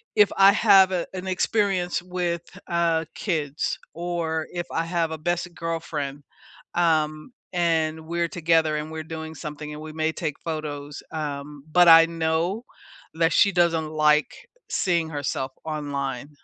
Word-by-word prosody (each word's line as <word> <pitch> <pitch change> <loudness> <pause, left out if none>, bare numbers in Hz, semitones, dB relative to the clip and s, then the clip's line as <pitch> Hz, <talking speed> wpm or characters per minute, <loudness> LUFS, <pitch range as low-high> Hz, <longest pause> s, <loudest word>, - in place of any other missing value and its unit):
if 210 -2 +5
I 195 0 +8
have, 195 -3 +6
uh, 175 -2 -1
an 185 0 -5
experience 185 -2 0
with, 175 -1 -2 0.3
uh, 170 -2 +1
kids 155 -6 -2 0.2
or 165 -2 -2
if 175 -1 -3
I 165 0 -1
have 165 -1 -1
a 160 - -4
best 175 +2 -2
girlfriend, 155 -4 -4 0.5
um, 155 +1 +1 0.2
and 160 -2 0
we're 170 0 0
together 160 -2 +2
and 150 +1 -5
we're 160 0 -5
doing 160 0 -7
something, 150 -1 -7
and 150 - -8
we 155 0 -7
may 160 0 0
take 155 -3 -4
photos, 150 -3 -5
um, 145 -2 -5
but 175 +1 +6
I 165 0 +10
know 165 +5 -1 0.5
that 165 0 +2
she 200 - +5
doesn't 170 -3 +2
like 150 0 +3 0.4
seeing 170 -3 +1
herself 145 -3 -3
online, 140 -3 -3
160 Hz, 145 wpm, -24 LUFS, 155-175 Hz, 0.5 s, I